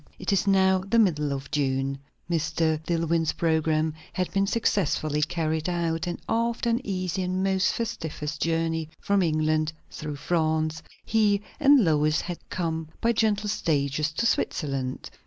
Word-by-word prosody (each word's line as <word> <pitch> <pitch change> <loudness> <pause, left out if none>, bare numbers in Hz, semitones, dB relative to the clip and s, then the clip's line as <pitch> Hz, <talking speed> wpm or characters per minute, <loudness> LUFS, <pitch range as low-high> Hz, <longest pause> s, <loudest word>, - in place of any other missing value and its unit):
It 190 +2 -1
is 195 +1 +1
now 190 -1 +4
the 195 +5 0
middle 150 -10 +3
of 135 0 -5
June. 135 -1 0 0.3
Mr. 160 -1 0
Dillwyn's 165 -1 +1
programme 160 -1 +1 0.2
had 185 -1 -2
been 195 0 +2
successfully 155 -8 +1
carried 160 0 -1
out; 170 -1 -1
and, 175 - -3
after 230 +1 0
an 235 +2 +1
easy 185 -3 -2
and 185 +1 -1
most 190 0 +2
festive 190 -9 -4 0.2
journey 165 -1 0
from 200 -1 +1
England, 155 -1 +1 0.2
through 150 -1 -5
France, 155 0 0 0.2
he 210 -2 +2 0.2
and 285 -6 +6
Lois 155 -1 +2
had 175 -2 -5
come 160 -3 -2
by 230 - +2
gentle 210 -2 +1
stages 150 -5 0
to 235 - -1
Switzerland. 135 - -1
165 Hz, 145 wpm, -26 LUFS, 155-195 Hz, 0.3 s, and